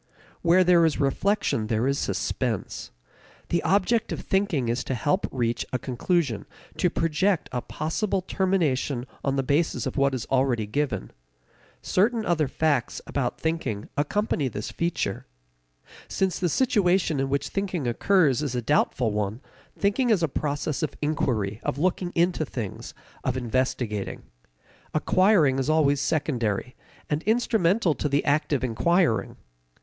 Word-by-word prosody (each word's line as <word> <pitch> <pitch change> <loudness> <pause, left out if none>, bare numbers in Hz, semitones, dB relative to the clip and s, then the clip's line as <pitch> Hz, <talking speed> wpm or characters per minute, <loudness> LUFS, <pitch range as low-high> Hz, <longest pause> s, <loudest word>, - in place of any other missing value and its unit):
Where 175 +2 +5
there 175 -1 +5
is 160 -3 +2
reflection 140 - +1
there 110 +2 0
is 140 +1 +1
suspense. - - -2 0.6
The 170 - +1
object 205 +4 +2
of - - -3
thinking 185 -10 0
is 120 +2 -1
to 130 - -2
help 155 - 0
reach 120 -2 -1
a 130 - 0
conclusion, 130 - -1 0.3
to 180 - +2
project 165 +3 0
a 125 -1 -2
possible 185 - -2
termination 155 -10 0 0.2
on 135 -1 0
the 135 - +1
basis 145 +5 +1
of - - -4
what 140 -1 +2
is 120 - -4
already 130 -4 +2
given. 140 +6 -2 0.7
Certain 220 +3 +1
other 155 -4 +1
facts 145 -3 0
about 130 -4 -2
thinking 145 -11 -2
accompany 150 -1 0
this 105 -3 -5
feature. 170 - -2 0.8
Since 190 -3 -1
the 180 - +1
situation 180 - +2
in 135 0 0
which 140 +1 -1
thinking 190 -7 -2
occurs 145 +1 +3
is 140 -4 -2
a 125 - 0
doubtful 125 -3 +1
one, 105 +2 -2 0.4
thinking 205 +5 +1
is 200 -7 +3
a - - +3
process 145 +1 -2
of 155 - -2
inquiry, 115 -9 0
of - - -2
looking 180 +2 0
into 170 -1 +2
things, 120 -8 -6 0.3
of 130 -1 -1
investigating. 120 -4 -2 0.7
Acquiring 165 -5 +4
is 135 - -1
always 145 -3 +3
secondary, 125 -8 -1 0.3
and 150 +1 -1
instrumental 215 -5 +2
to 150 - -2
the 140 +1 +1
act 150 +1 +1
of 140 -3 +1
inquiring. 145 +3 +1
150 Hz, 145 wpm, -26 LUFS, 130-180 Hz, 0.8 s, Where